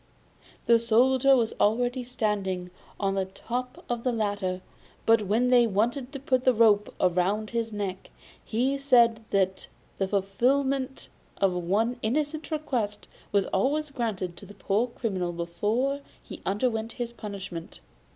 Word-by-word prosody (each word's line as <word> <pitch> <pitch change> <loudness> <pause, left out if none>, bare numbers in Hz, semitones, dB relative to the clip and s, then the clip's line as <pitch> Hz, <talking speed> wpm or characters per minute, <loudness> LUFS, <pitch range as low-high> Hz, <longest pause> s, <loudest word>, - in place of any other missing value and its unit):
The 235 -1 +5
Soldier 255 +4 +4
was 230 -3 +1
already 245 +4 +2
standing 200 -7 -2 0.3
on 195 -1 +1
the 195 -1 0
top 245 +6 -5
of 240 -1 -2
the 255 - +1
ladder; 205 -5 -1 0.4
but 225 0 +5
when 240 +5 +2
they 240 -2 +6
wanted 240 +6 0
to 275 - -6
put 255 -2 +1
the 255 -2 +4
rope 210 -2 +4
round 185 +4 +1
his 230 -1 -1
neck, 200 -3 -4 0.3
he 260 +5 0
said 235 -5 +4
that 190 -1 0 0.3
the 195 - +1
fulfilment 260 +8 0 0.3
of 195 -2 +2
one 205 +8 0
innocent 300 +7 -1
request 250 -10 -2 0.2
was 200 -2 +3
always 290 +9 +1
granted 205 -9 -3
to 200 - -11
a 205 - -12
poor 215 +5 0
criminal 195 -7 -2
before 210 +12 -1 0.2
he - - -9
underwent 220 +2 0
his 240 -1 -4
punishment. 195 -6 -7
225 Hz, 140 wpm, -27 LUFS, 195-250 Hz, 0.4 s, they